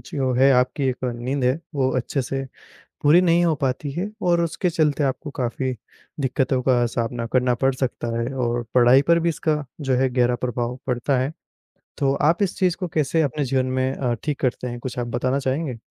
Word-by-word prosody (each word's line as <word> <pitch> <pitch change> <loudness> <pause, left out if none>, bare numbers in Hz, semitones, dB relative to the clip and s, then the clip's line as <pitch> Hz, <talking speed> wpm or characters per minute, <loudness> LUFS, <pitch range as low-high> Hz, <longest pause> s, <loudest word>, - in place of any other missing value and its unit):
जो 135 -3 -2
है 135 +2 +5
आपकी 125 +2 +1
एक 130 0 -3
नींद 125 +2 -2
है, 130 +4 +2 0.2
वो 130 -2 +1
अच्छे 130 +2 -1
से 135 +2 -3 0.6
पूरी 155 +5 +6
नहीं 175 -1 +3
हो 165 - +3
पाती 135 +2 -1
है 180 +8 -3
और 175 -1 +2
उसके 170 +2 -1
चलते 150 -3 +1
आपको 135 +3 -2
काफ़ी 130 +1 -2 0.5
दिक्कतों 130 -1 0
का 120 -2 +3
सामना 115 0 -2
करना 125 -1 +3
पड़ 135 0 +4
सकता 130 -2 -3
है 120 +3 -2
और 120 -2 -1
पढ़ाई 125 +2 +6
पर 170 0 +5
भी 170 0 +1
इसका 155 -2 -1 0.2
जो 135 -2 +1
है 130 0 +2
गहरा 125 -1 +2
प्रभाव 120 0 -3
पड़ता 125 +2 0
है। 135 +4 -1 0.6
तो 135 -1 +2
आप 155 +7 +2
इस 185 - -2
चीज़ 180 -3 +1
को 180 - -3
कैसे 155 +1 +1
अपने 145 0 -1
जीवन 130 0 +1
में 130 0 0
अ, 125 -3 -1
ठीक 150 -2 -2
करते 125 -1 -1
हैं? 120 0 -5
कुछ 125 0 -5
आप 120 - -2
बताना 130 +3 0
चाहेंगे? 135 -1 -2
130 Hz, 205 wpm, -23 LUFS, 125-150 Hz, 0.6 s, पूरी